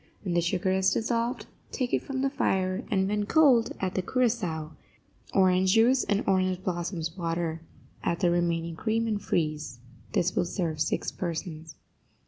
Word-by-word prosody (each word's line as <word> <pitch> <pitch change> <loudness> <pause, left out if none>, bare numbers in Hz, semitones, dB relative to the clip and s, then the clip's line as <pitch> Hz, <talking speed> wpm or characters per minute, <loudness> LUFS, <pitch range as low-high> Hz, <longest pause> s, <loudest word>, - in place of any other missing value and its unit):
When 180 -4 -2
the 170 - +3
sugar 180 +2 0
is 190 0 +3
dissolved, 235 +2 -1 0.3
take 250 -2 -2
it - - +2
from 270 -1 -3
the 275 - +2
fire, 190 -4 0
and, 190 -2 +1
when 205 0 -1
cold, 270 -7 +5
add 190 -1 -2
the 185 - 0
curaçao, 185 -9 -1 0.6
orange 185 0 +4
juice 245 +3 +4
and 205 0 +1
orange 185 -1 +1
blossoms 170 -2 -3
water; 165 -2 -2 0.4
add 170 - 0
the 175 -2 +3
remaining 170 -1 0
cream, 225 +5 0
and 215 -2 -1
freeze. 155 -8 -2 0.4
This 180 +1 +1
will - - +2
serve 165 -4 -2
six - - 0
persons. 160 -2 -5
185 Hz, 160 wpm, -28 LUFS, 170-215 Hz, 0.6 s, cold